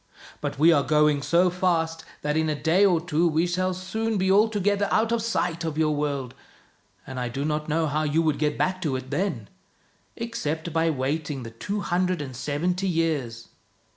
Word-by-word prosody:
But - - -3
we 165 +4 +6
are 145 - +4
going 150 +1 +3
so 175 +5 +3
fast 165 -3 0 0.2
that 150 0 0
in 160 0 +1
a 150 -1 -2
day 165 +6 +3
or 175 -4 +3
two 165 0 +1
we 160 +1 +2
shall 185 +1 0
soon 215 +4 -2
be 190 0 +2
altogether 205 -1 +2
out 225 +1 +2
of 235 -1 +1
sight 175 -7 -1
of 160 -2 -3
your 155 -1 +2
world, 140 -4 -2 0.7
and 130 -1 -6
I 125 -1 -2
do 135 +4 -3
not 150 0 -2
know 160 +2 +1
how 150 +1 0
you 155 +2 +1
would 155 -3 0
get 150 -1 0
back 185 0 0
to 150 -6 -1
it 130 +1 -6
then, 145 - -2 0.7
except 165 -8 -4
by 165 0 +2
waiting 145 -1 -2
the 115 - -8
two 200 - -4
hundred 180 -1 0
and 135 -4 -6
seventy 175 +8 -1
years." 150 -10 -1
160 Hz, 195 wpm, -25 LUFS, 145-185 Hz, 0.7 s, we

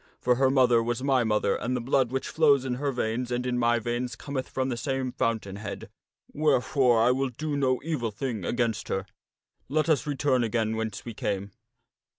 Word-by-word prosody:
For 125 -1 +2
her 135 0 +4
mother 125 -3 +4
was 120 +2 -2
my 135 -3 +3
mother, 105 -3 +1
and 125 +2 -2
the - - 0
blood 125 0 +1
which 135 0 -2
flows 145 -4 +3
in 130 - -1
her 145 -1 0
veins 120 0 -2
and 125 +1 -1
in 125 -1 0
my 120 0 +3
veins 120 +2 -3
cometh 135 -1 -5
from 130 0 -1
the 125 - -1
same 130 +1 -2
fountain 110 -5 -2
head, 100 -1 -7 0.4
wherefore 130 -4 +3
I 120 - +5
will 135 +1 0
do 150 +4 -4
no 130 -2 +1
evil 150 -8 -1
thing 110 -1 -4
against 115 +2 -1
her. 95 0 -2 0.6
Let 155 +3 +1
us 155 -1 +2
return 135 -3 +1
again 110 -1 0
whence 110 -2 -4
we 120 - -6
came." 100 -1 -3
125 Hz, 195 wpm, -27 LUFS, 115-135 Hz, 0.6 s, I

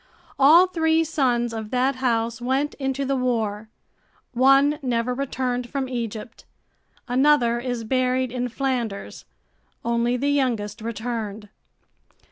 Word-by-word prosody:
All 315 +7 +7
three 325 -3 +1
sons 245 -7 0
of 220 -1 -5
that 255 +2 +1
house 235 -2 -1
went 265 +4 0
into 270 0 -2
the 275 +1 0
war. 220 -4 -1 0.6
One 275 +4 +4
never 245 -2 -1
returned 250 -2 -2
from 275 -2 -2
Egypt, 230 -3 -6 0.6
another 250 -2 +3
is 245 -2 -3
buried 255 +1 0
in 250 0 -2
Flanders. 245 -5 -3 0.6
Only 235 +1 +1
the 285 +3 0
youngest 230 -6 -1
returned. 220 -2 -5
250 Hz, 115 wpm, -23 LUFS, 230-270 Hz, 0.6 s, All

